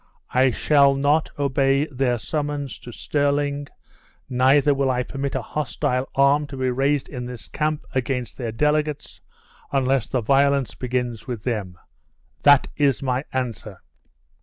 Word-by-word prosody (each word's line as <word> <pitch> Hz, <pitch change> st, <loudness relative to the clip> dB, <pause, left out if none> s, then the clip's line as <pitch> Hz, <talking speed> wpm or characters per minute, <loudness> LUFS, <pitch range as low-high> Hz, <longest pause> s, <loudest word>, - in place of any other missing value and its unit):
I 130 Hz, +1 st, +4 dB
shall 140 Hz, +2 st, +4 dB
not 145 Hz, +3 st, +2 dB
obey 140 Hz, 0 st, +2 dB
their 130 Hz, -4 st, 0 dB
summons 145 Hz, +4 st, -3 dB
to 120 Hz, -, -10 dB
Stirling; 145 Hz, +2 st, -1 dB, 0.6 s
neither 135 Hz, +3 st, +4 dB
will 135 Hz, -1 st, 0 dB
I 125 Hz, -1 st, +1 dB
permit 135 Hz, +1 st, -4 dB
a 130 Hz, -, -2 dB
hostile 130 Hz, -1 st, -2 dB
arm 140 Hz, +2 st, +3 dB
to 140 Hz, -, -8 dB
be 130 Hz, -1 st, 0 dB
raised 140 Hz, +2 st, +1 dB
in 125 Hz, -1 st, -6 dB
this 125 Hz, -2 st, -8 dB
camp 155 Hz, -1 st, -2 dB
against 125 Hz, -1 st, -2 dB
their 120 Hz, -4 st, -4 dB
delegates, 150 Hz, +4 st, -1 dB, 0.5 s
unless 135 Hz, -2 st, +1 dB
the 130 Hz, -, -1 dB
violence 140 Hz, +1 st, +2 dB
begins 125 Hz, -2 st, -3 dB
with 120 Hz, -5 st, -5 dB
them. 100 Hz, -8 st, -3 dB, 0.7 s
This 145 Hz, -1 st, +7 dB, 0.2 s
is 140 Hz, -4 st, +2 dB
my 130 Hz, +1 st, -1 dB
answer." 125 Hz, -5 st, -4 dB
135 Hz, 140 wpm, -23 LUFS, 125-145 Hz, 0.7 s, This